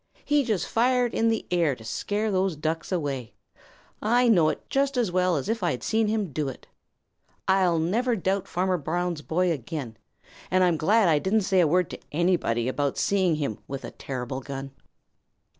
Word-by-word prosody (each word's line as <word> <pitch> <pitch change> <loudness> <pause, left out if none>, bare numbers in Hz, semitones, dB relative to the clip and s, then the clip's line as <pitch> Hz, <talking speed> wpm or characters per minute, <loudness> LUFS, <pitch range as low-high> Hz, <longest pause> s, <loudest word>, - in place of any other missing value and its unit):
He 295 -1 +3
just 215 -8 -1
fired 245 +1 +2
in 230 - +2
the 225 -1 -1
air 170 -6 +2
to 110 - -14
scare 210 - -2
those 190 -2 +1
Ducks 160 +3 -3
away. 140 - -3 0.7
I 240 +3 +3
know 170 -8 +5
it - - -5
just 275 -1 0
as 230 -7 +1
well 180 -1 +2
as 140 - -3
if 225 +1 -1
I 175 - +1
had 125 - -3
seen 220 0 +1
him 210 -5 -1
do 150 -1 -1
it. 130 - -10 0.8
I'll 190 -3 +3
never 225 +10 +1
doubt 195 0 -1
Farmer 185 0 0
Brown's 170 +2 -2
boy 175 +3 +1
again. 135 -5 -5 0.5
And 185 0 +3
I'm 175 -2 +3
glad 205 +6 +3
I 155 -3 +4
didn't 205 +7 +1
say 190 -1 +2
a 170 - +5
word 180 +2 +1
to - - -7
anybody 150 -8 +1
about 140 +1 -1
seeing 190 -5 +2
him 140 -8 -3
with 135 0 -5
a - - -7
terrible 130 0 -5
gun." 135 0 -6
180 Hz, 190 wpm, -26 LUFS, 150-210 Hz, 0.8 s, know